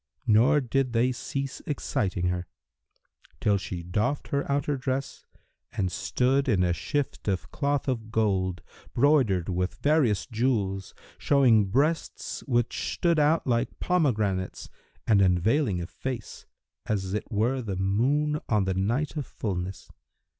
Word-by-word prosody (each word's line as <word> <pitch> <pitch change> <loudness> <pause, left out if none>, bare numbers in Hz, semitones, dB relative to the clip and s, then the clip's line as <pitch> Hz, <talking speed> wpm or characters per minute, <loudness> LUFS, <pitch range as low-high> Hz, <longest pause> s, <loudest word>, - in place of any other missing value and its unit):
Nor 115 +7 +5
did 130 0 0
they 120 +2 +3
cease 135 +2 -4
exciting 95 - -1
her, 90 -1 -3 0.9
till 100 -1 +2
she 90 -2 -5
doffed 105 +11 -1
her 140 0 -1
outer 145 +1 0
dress 130 0 -4 0.5
and 95 -2 -1
stood 135 - +1
in 95 -6 +3
a 90 -1 +2
shift 145 - -3
of 95 -3 -2
cloth 145 -1 -1
of 115 -4 -2
gold,[FN#325] 95 -5 -2
broidered 120 - +3
with 90 0 -1
various 130 - +2
jewels, 105 -5 -1 0.2
showing 125 -7 +4
breasts 140 - -1
which 120 -3 0
stood 170 -3 +2
out 150 +2 +3
like 120 0 -1
pomegranates 110 - 0 0.4
and 105 -3 +4
unveiling 95 - +2
a 85 - -3
face 125 +4 -6 0.4
as 95 -3 -1
it 105 - -4
were 120 +5 +1
the 100 -5 -4
moon 135 +11 +1
on 105 -3 +3
the 95 0 0
night 120 - -1
of 145 -5 -3
fullness. 95 -2 -4
115 Hz, 135 wpm, -27 LUFS, 95-140 Hz, 0.9 s, Nor